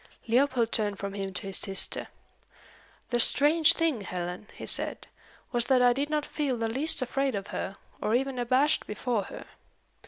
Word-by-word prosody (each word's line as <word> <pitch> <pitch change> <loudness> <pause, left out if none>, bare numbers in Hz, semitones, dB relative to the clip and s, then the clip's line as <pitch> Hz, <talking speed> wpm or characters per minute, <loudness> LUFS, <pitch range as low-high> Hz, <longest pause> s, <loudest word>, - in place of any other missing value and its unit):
Leopold 240 -1 +1
turned 210 -3 0
from 200 0 -6
him 195 -1 -5
to 185 - -4
his 195 -1 -1
sister. 195 -1 -1 1.0
"The 240 - +1
strange 300 +6 +6
thing, 320 -9 0
Helen," 180 +1 -6
he - - -8
said, - - -1 0.5
"was 240 -1 +2
that 255 -2 +3
I 245 0 +5
did 280 +4 -2
not 300 -1 -1
feel 280 -5 -2
the 225 0 -2
least 275 +5 +3
afraid 270 0 -2
of 200 +1 -6
her, 195 - -5 0.2
or 215 - 0
even 265 0 -1
abashed 260 +5 +1
before 210 -1 -2
her. - - -10
240 Hz, 175 wpm, -27 LUFS, 205-275 Hz, 1.0 s, strange